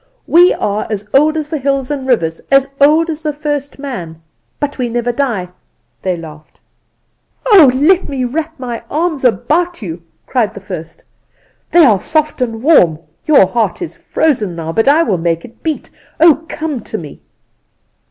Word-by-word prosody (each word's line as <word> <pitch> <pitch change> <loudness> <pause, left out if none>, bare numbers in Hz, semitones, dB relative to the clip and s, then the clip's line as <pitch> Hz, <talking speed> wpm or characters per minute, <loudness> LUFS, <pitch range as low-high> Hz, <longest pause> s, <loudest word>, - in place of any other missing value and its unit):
We 350 +2 +5
are 205 +1 -2
as 210 -1 -4
old 305 +3 +4
as 305 -2 -3
the 310 - -2
hills 275 0 -1
and 270 -2 -4
rivers, 165 -10 0
as 275 0 +4
old 310 +4 +5
as 310 0 -6
the 305 -1 -1
first 290 -1 -4
man; 185 - -7 0.4
but 290 -1 -3
we 245 -1 -1
never 240 +1 -1
die,' 235 -9 -2 0.5
they 185 -2 -1
laughed. 155 -2 -12 0.9
"'Oh, 385 - +7
let 345 +8 +3
me 270 -2 -2
wrap 315 +5 -3
my 240 -2 -5
arms 315 -2 -1
about 310 - +1
you!; 170 -2 -6 0.2
cried 235 -7 -1
the - - -7
first; 175 -4 -8 0.7
'they 345 -2 +6
are 215 -7 +4
soft 305 - -1
and 225 -2 -2
warm. 180 - +5 0.3
Your 295 -10 +6
heart 220 +1 -1
is 350 - -6
frozen 220 - -1
now, 165 -1 -4
but 225 +8 0
I 305 +4 +5
will 195 - 0
make 165 0 -1
it 235 - -17
beat. 315 -2 -4 0.3
Oh, 320 -1 +5
come 305 -4 -3
to - - -6
me! 150 -4 -10
265 Hz, 170 wpm, -15 LUFS, 200-305 Hz, 0.9 s, Oh